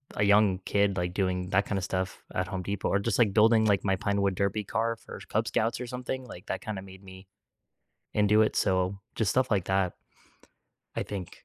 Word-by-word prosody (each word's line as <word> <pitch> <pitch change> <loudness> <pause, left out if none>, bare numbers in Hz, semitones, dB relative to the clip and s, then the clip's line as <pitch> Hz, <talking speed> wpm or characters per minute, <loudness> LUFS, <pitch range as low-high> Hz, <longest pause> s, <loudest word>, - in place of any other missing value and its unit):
a 105 - +1
young 100 -2 +4
kid, 100 -1 +2
like, 90 -1 -1
doing 90 -2 -1
that 100 +1 +3
kinda 100 -2 -1
stuff 95 0 -3
at 90 0 0
Home 95 0 -3
Depot 100 +1 -2
or 100 - +2
just, 105 +2 -1
like, 110 -5 +4
building, 110 +1 +5
like, 100 -2 +2
my 95 -1 +3
pinewood 100 -1 0
derby 100 +2 0
car 115 +3 -1
for - - -10
Cub - - 0
Scouts 115 +2 0
or 125 - -4
something, 125 +1 -4
like, 100 -5 -11
that - - -3
kinda 105 -3 -5
made 95 0 -13
me 95 0 -13 0.9
into 105 +1 +4
it 110 - -1
so, 95 0 +1 0.2
just 105 -4 +1
stuff 130 +1 +1
like 95 -4 +2
that, 95 -1 +1 1.0
I - - 0
think 95 -4 -7
100 Hz, 205 wpm, -28 LUFS, 95-110 Hz, 1.0 s, building